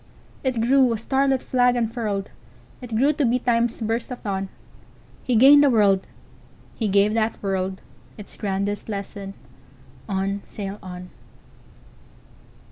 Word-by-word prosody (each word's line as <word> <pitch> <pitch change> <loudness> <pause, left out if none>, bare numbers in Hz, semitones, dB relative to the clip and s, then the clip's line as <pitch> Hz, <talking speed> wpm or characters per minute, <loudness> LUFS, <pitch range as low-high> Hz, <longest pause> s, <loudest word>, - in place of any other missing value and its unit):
It 260 -3 0
grew, 255 +2 +4
a - - -2
starlit 265 +3 +1
flag 250 -1 +2
unfurled! 225 -4 -2 0.5
It 240 -3 -6
grew 275 +7 +3
to 295 - -1
be 245 -1 +2
Time's 235 -1 0
burst 225 +2 -2
of 250 - -8
dawn. 195 -2 -3 0.7
He 250 - 0
gained 280 +5 +8
a 285 - +5
world; 200 -5 +3 0.7
he 225 - -1
gave 200 +1 +3
that 225 0 0
worldIts 190 +1 -5
grandest 200 +1 -3
lesson: 200 -1 -6 0.7
"On! 195 +1 -1
sail 200 0 -6
on!" 180 -1 -9
220 Hz, 125 wpm, -23 LUFS, 195-245 Hz, 0.7 s, gained